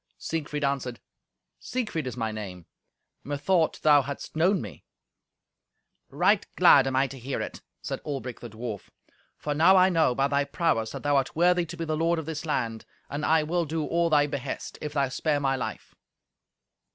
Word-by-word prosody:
Siegfried 150 -2 -3
answered, 135 -3 -1 0.6
"Siegfried 215 - -3
is 125 - -5
my 110 -2 -1
name. 95 -5 -7 0.6
Methought 155 +4 +1
thou 150 -2 +6
hadst 140 +3 -7
known 180 +5 +3
me." 100 - -9 1.3
"Right - - +3
glad 135 -1 +7
am 135 - -1
I 135 +1 +4
to 135 0 -8
hear 130 +3 -4
it," - - -5 0.2
said - - -4
Albric 135 -4 -5
the 120 - -8
dwarf, 110 -2 -7 0.5
"for 150 - -3
now 170 +6 +6
I 185 +1 +6
know, 160 -8 +2
by 135 +2 +2
thy 140 0 +1
prowess, 140 -7 0
that - - -7
thou 145 -1 +3
art 135 -1 -1
worthy 175 +1 +3
to 170 +2 -8
be 165 - -3
the 155 -1 -1
lord 165 +2 +1
of 160 - -4
this 160 0 -5
land, 115 -6 -2 0.3
and 145 +1 -3
I 160 0 +3
will 170 +2 0
do 155 0 -2
all 170 0 +1
thy 145 -2 +4
behest, 140 -2 -5
if 150 - -4
thou 140 -2 +1
spare 145 +3 0
my 135 -1 +1
life." 130 - -6
145 Hz, 185 wpm, -27 LUFS, 130-160 Hz, 1.3 s, glad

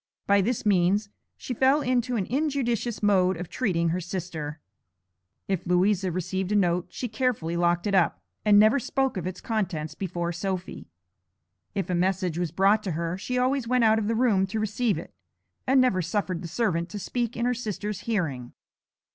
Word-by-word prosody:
By 200 0 +4
this 225 +3 -1
means 200 +1 +2 0.3
she 250 - -5
fell 265 +5 +3
into 250 -1 0
an 200 -5 0
injudicious 245 -5 -1
mode 190 -3 +3
of 175 0 -6
treating 170 -9 0
her 175 +3 0
sister. 165 -4 -5 0.9
If 190 -3 -1
Louisa 185 +1 +2
received 185 +2 -2
a - - +2
note 180 -3 +2
she 250 - -4
carefully 220 -8 -1
locked 175 0 +1
it 205 - 0
up, 185 -3 +3 0.2
and 210 -1 +5
never 215 +6 +6
spoke 270 +2 -1
of 185 -2 -3
its 185 -1 -6
contents 180 - -2
before 175 -1 -3
Sophy. 185 - -4 0.9
If 195 - -1
a 180 - -2
message 180 -1 0
was 175 -2 -1
brought 195 +4 +3
to 185 - -1
her 170 +2 -2
she 250 +6 -3
always 255 0 +1
went 250 0 +2
out 220 0 +5
of 210 - -2
the 225 - +1
room 215 -5 +3
to 215 +3 -3
receive 215 -2 0
it, 165 - -8 0.5
and 265 +1 +5
never 250 -8 +3
suffered 180 0 -2
the 175 - -5
servant 175 -3 -1
to 205 - -6
speak 235 +4 -3
in 235 - 0
her 250 - +2
sister's 210 -4 -4
hearing. 155 - -2
195 Hz, 185 wpm, -26 LUFS, 175-230 Hz, 0.9 s, never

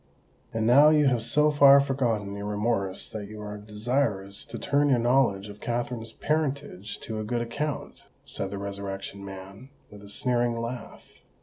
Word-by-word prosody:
"And 110 -1 -1
now 140 +6 +7
you 150 -1 +4
have 125 -3 +1
so 150 +6 +3
far 140 -1 +8
forgotten 120 -8 0
your 100 0 -5
remorse 105 -2 -1
that 105 -2 -6
you 105 +1 -9
are 105 0 -6
desirous 105 -2 -2
to 115 - -7
turn 145 +3 +2
your 130 - +4
knowledge 120 -5 +2
of 105 0 -11
Katherine's 120 -1 -3
parentage 140 -9 -2
to 110 -1 -4
a - - -3
good 120 +2 -1
account?" 140 +5 -4 0.2
said 100 - -4
the 100 - -5
Resurrection 100 0 -5
Man, 95 +5 -10 0.2
with 105 -1 -12
a 100 - -12
sneering 120 +1 0
laugh. 115 +1 -7
115 Hz, 170 wpm, -27 LUFS, 100-130 Hz, 0.2 s, far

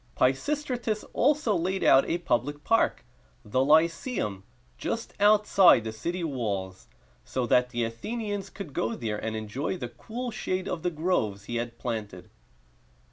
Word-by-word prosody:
Pisistratus 235 - 0
also 285 -4 +2
laid 185 +2 -1
out 135 - +5
a 170 - +1
public 145 -2 -1
park, 225 - +2 0.4
the 130 +5 +1
Ly 155 +3 +7
ce´um, 165 - -3 0.4
just 230 0 -3
outside 205 - +6
the 110 - -4
city 170 +11 -4
walls, 100 - -3 0.4
so 130 -1 -2
that 125 +1 +3
the 120 -1 -1
Athenians 205 - -4
could 190 -8 -8
go 115 - -1
there, 105 -3 -4
and 110 0 -2
enjoy 110 - -3
the 125 -7 -5
cool 240 - -6
shade 185 -3 -2
of 165 - -3
the 180 - 0
groves 150 - -1
he 120 - -4
had 120 0 -4
planted. 110 -7 -5
145 Hz, 150 wpm, -27 LUFS, -, 0.4 s, Ly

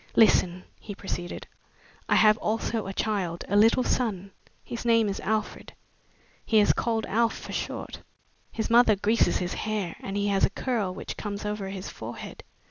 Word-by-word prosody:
"Listen," 185 -5 +4 0.2
he 205 - -8
proceeded. 175 -3 -5 0.6
"I - - +4
have 215 -1 +6
also 220 -1 -1
a - - -3
child 195 -5 -2
a 200 - -1
little 225 +4 +5
son. 200 -8 -1 0.3
His 235 - -6
name 230 -2 +3
is 200 - -3
Alfred. 215 +1 -3 0.7
He 220 - +3
is 205 - +4
called 225 -2 -1
Alf, 230 +2 +1
for - - -9
short. - - -5 0.5
His 225 0 -3
mother 230 -2 +6
greases 215 +4 +2
his 175 -1 -3
hair 210 -6 -3
and 195 +1 -4
he 205 0 0
has 195 -1 +1
a - - +5
curl 215 -3 -2
which - - -7
comes 205 -1 -5
over 210 -2 -3
his 195 -1 -6
forehead. - - -8
210 Hz, 170 wpm, -27 LUFS, 195-225 Hz, 0.7 s, have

